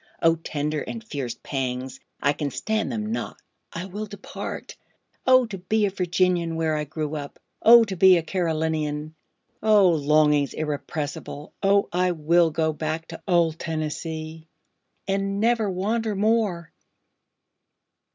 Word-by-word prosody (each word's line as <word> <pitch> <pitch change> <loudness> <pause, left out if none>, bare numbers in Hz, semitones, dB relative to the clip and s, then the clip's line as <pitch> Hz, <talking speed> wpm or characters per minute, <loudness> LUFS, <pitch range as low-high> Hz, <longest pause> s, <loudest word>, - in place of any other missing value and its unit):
O 165 0 +5
tender 150 -2 -3
and 230 -1 -6
fierce 135 - -5
pangs—I 130 +1 -3
can 145 -1 -3
stand 220 +8 -2
them 215 -2 -3
not—I 180 -5 -7
will 205 +3 -6
depart;O 250 +5 -2
to 205 -4 -7
be 210 +4 +1
a 200 - -1
Virginian, 180 -2 +1
where 160 -1 0
I 150 0 -2
grew 155 +1 -4
up! 145 -1 -7 0.2
O 235 +1 +9
to 200 -4 -4
be 185 0 +7
a 165 - -1
Carolinian!O 160 +4 0
longings 150 -2 +3
irrepressible! 150 0 -4
O 200 0 +3
I 180 0 +2
will 170 +1 +3
go 160 0 0
back 155 +1 -4
to 165 - -8
old 170 -3 +2
Tennessee, 160 0 -4 0.6
and 195 0 -1
never 225 -1 +2
wander 210 +4 -1
more! 205 -5 +1
165 Hz, 125 wpm, -24 LUFS, 155-200 Hz, 0.6 s, O